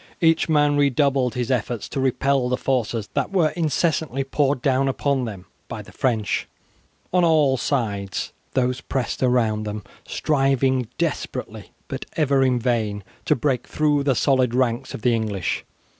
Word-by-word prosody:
Each 165 0 +3
man 145 -2 +3
redoubled 140 -2 +2
his 125 +1 -1
efforts 120 -2 -1
to - - -3
repel 135 0 +1
the 125 - +1
forces 120 -5 -1
that - - -1
were 175 -6 +3
incessantly 155 -4 0
poured 135 -1 0
down 135 -1 +2
upon 135 -1 0
them 100 -5 -7 0.2
by - - -6
the - - -15
French. 115 -5 0 0.7
On 180 -1 +4
all 155 -5 +4
sides 105 - -2 0.2
these 125 -1 +1
pressed 130 -3 -3
around 120 -4 +2
them, 105 -1 -5 0.2
striving 135 -3 +1
desperately, - - -3 0.2
but - - -6
ever 140 -3 +2
in 130 -2 +3
vain, 110 -4 -1 0.2
to - - +3
break 130 -1 -1
through 150 -1 +1
the 135 -2 +2
solid 130 -3 +2
ranks 130 0 0
of 105 - -9
the 120 - +3
English. 105 -5 -2
130 Hz, 155 wpm, -23 LUFS, 120-140 Hz, 0.7 s, On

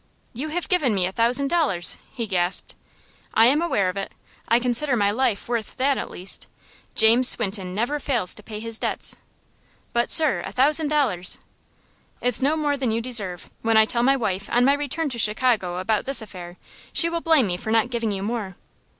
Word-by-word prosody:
"You 265 +6 -5
have 340 +3 -3
given 295 - +1
me 185 -2 +1
a 185 - -2
thousand 245 +6 +2
dollars!" 290 - +1
he 235 - -4
gasped. 185 -2 -1 0.6
"I 225 - +6
am 280 +6 +3
aware 210 - 0
of 185 +2 -3
it. 195 - -4 0.4
I 230 - +4
consider 250 +3 +1
my 205 -3 +1
life 225 -2 -1
worth 235 -2 -4
that, 275 +2 +2
at - - -5
least. 185 +2 -4 0.5
James 235 +3 +6
Swinton 195 -4 0
never 245 +8 -1
fails 240 -11 +1
to - - -10
pay 210 0 -8
his 230 0 -2
debts." - - -1 0.8
"But, 235 0 +1
sir, 310 -3 +3
a - - -6
thousand 300 +4 +3
dollars 260 -13 0 0.4
" - - -38
"It's 250 +2 0
no 290 +4 +1
more 295 -2 -1
than 260 -3 -1
you 225 +1 0
deserve. 215 -7 -2
When 225 0 +2
I 220 - +6
tell 235 +2 -1
my 270 +3 +3
wife, 200 -6 -3
on 245 +1 +3
my 275 - +4
return 290 +3 -3
to 240 -3 -5
Chicago, 215 -5 +1
about 210 +3 -1
this 275 -2 +3
affair, 180 -4 -10 0.3
she 335 - +4
will 335 0 -3
blame 320 -7 +4
me 180 -3 -2
for 185 - -7
not 225 +2 +1
giving 230 -3 -2
you 195 -1 -4
more." 210 -4 -4
235 Hz, 200 wpm, -23 LUFS, 205-275 Hz, 0.8 s, I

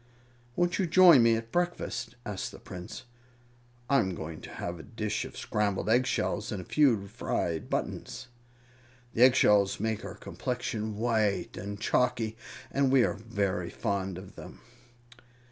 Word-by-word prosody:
"Won't 175 +1 +1
you 185 - +2
join 170 -5 +8
me 115 0 +5
at 115 0 -5
breakfast?" 130 -9 -2
asked 100 -2 -4
the - - -11
prince. 90 -1 -9 0.8
"I'm 105 -10 +2
going 80 0 -7
to - - -9
have 85 -1 -5
a - - -9
dish 110 -2 -3
of - - -10
scrambled 105 0 -1
egg 125 +2 +4
shells 105 -3 -1
and 105 - -3
a - - -6
few 125 -10 +3
fried 90 -6 -3
buttons. - - -4 0.9
The 115 - -1
eggshells 105 -6 +5
make 110 0 -1
our 100 +1 -7
complexion 110 -3 -4
white 110 -3 0
and 100 +2 -6
chalky, 115 -1 +1 0.4
and 135 -1 +2
we 135 -2 +6
are - - +1
very 100 -5 -2
fond 95 -4 -2
of 95 +2 -10
them." - - -11
110 Hz, 150 wpm, -29 LUFS, 100-125 Hz, 0.9 s, join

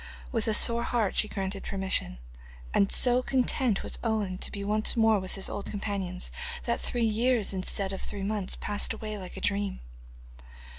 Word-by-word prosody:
With 225 -3 -1
a 220 - +4
sore 235 +2 +5
heart 235 -4 0
she 215 - +3
granted 195 -1 -4
permission, 190 - -1 0.6
and 200 - +3
so 250 0 +4
content 255 -4 +1
was - - -4
Owen 210 -5 -1
to - - -2
be 200 - -5
once 215 +3 +2
more 220 -2 +4
with 185 0 -6
his 195 - +2
old 200 - -4
companions 195 -3 -3 0.3
that - - -1
three 240 -2 0
years 225 -1 +1
instead 190 +1 0
of 190 - -5
three 200 -2 -5
months 205 -2 -1
passed 205 +2 +1
away 215 -1 -5
like 185 -1 -8
a - - -6
dream. 200 -1 0
205 Hz, 180 wpm, -28 LUFS, 195-225 Hz, 0.6 s, sore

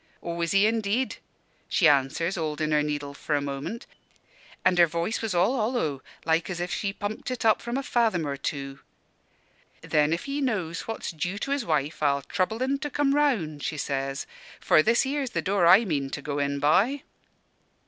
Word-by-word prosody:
"'Aw, 170 0 -4
is 170 - 0
he 195 +1 +5
indeed?' 225 +3 0 0.5
she 175 - +4
answers, 145 +5 +2
holdin' 155 -3 -2
her 150 -1 +3
needle 145 -1 -3
for 150 +1 -2
a - - +2
moment 140 +10 -5 0.8
an' 185 - +4
her 170 -1 +7
voice 170 +7 -2
was 220 -5 -2
all 185 +9 +3
hollow, 215 - -1 0.2
like 165 +2 +1
as 175 -2 -4
if 175 0 -2
she 200 - -1
pumped 205 +3 -5
it 250 -2 -3
up 220 - +4
from 235 +2 -3
a 275 - -2
fathom 225 -11 +1
or 140 -1 -2
two. 140 -1 -5 1.0
'Then, 150 0 +2
if 170 - -1
he 280 +1 -2
knows 190 - -2
what's 225 - -4
due 175 +4 -3
to 275 +6 -4
his 280 -2 0
wife, 150 -2 -1
I'll 140 -2 +2
trouble 200 - -1
en 275 +1 0
to 295 - -3
come 280 0 +1
round,' 220 - +1
she 155 - -3
says; 135 -1 -2 0.3
'for 155 - +5
this 230 +8 +3
here's 275 -1 -2
the - - +2
door 190 -3 +2
I 200 +7 +7
mean 140 -7 -1
to 140 - -5
go 145 0 -3
in 140 0 0
by.'" 200 - +2
175 Hz, 195 wpm, -26 LUFS, 150-225 Hz, 1.0 s, her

